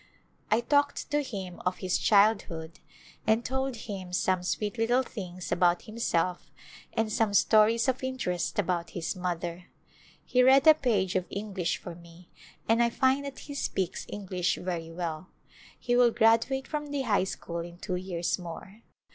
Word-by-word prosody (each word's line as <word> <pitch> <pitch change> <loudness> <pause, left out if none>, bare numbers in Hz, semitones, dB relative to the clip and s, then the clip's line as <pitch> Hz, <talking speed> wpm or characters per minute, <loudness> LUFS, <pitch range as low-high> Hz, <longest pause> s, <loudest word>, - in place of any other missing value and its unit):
I 220 +2 +3
talked 285 +3 +1
to 295 0 +2
him 190 -9 -6
of 180 0 -1
his 185 -1 -1
childhood 195 -6 +2 0.5
and 220 +2 +3
told 265 0 -2
him 195 -5 -7
some 185 0 +1
sweet 210 +5 -2
little 240 +3 +3
things 185 -7 -7
about 175 0 +3
himself 185 -5 -1 0.4
and 220 -1 0
some 215 -2 +1
stories 220 +4 +4
of 260 +1 0
interest 220 -10 -2
about 175 -4 0
his 170 - -2
mother. 175 -1 -4 0.6
He 250 - +3
read 265 +3 +6
a 315 - +10
page 215 -11 0
of 185 -1 0
English 200 -3 -2
for - - -8
me 170 +1 -16 0.4
and 225 +1 +4
I 235 - +4
find 265 +3 +2
that 275 -1 -7
he 285 - -7
speaks 190 -9 -2
English 185 -3 -1
very 175 -3 -4
well. 165 0 -5 0.5
He 245 - 0
will 245 -1 +6
graduate 230 +4 +2
from 300 -1 -3
the 285 -1 -2
high 205 -6 +2
school 170 -2 -5
in 170 +1 -7
two 185 0 -3
years 180 -1 -2
more. 180 +5 -9
200 Hz, 165 wpm, -28 LUFS, 180-240 Hz, 0.6 s, a